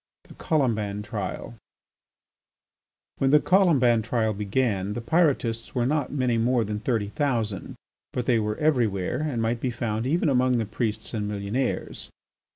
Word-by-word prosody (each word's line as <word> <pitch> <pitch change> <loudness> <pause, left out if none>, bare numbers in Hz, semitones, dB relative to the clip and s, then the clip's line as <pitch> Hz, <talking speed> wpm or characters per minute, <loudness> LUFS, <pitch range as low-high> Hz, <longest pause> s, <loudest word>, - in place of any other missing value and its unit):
VIII. - - -23
THE - - -13
COLOMBAN 110 -9 0
TRIAL 95 - -5 1.6
When 135 - +3
the 150 +2 +6
Colomban 145 - +4
trial 110 -1 0
began, 105 -1 -1
the 120 - -3
Pyrotists 120 -4 0
were 120 -1 +1
not 145 +3 0
many 125 -5 +1
more 120 +1 +2
than 105 0 -3
thirty 110 -3 -1
thousand, 115 -7 -2 0.4
but 125 - -3
they 120 -3 +3
were 105 0 -2
every 145 -7 +3
where 95 +2 -3
and 145 -6 -2
might 115 +1 0
be 130 - -1
found 115 -1 -2
even 165 +4 +1
among 130 -2 +3
the 115 - 0
priests 110 +1 -3
and 105 -2 -2
millionaires. 105 +5 -3
115 Hz, 160 wpm, -25 LUFS, 105-130 Hz, 1.6 s, the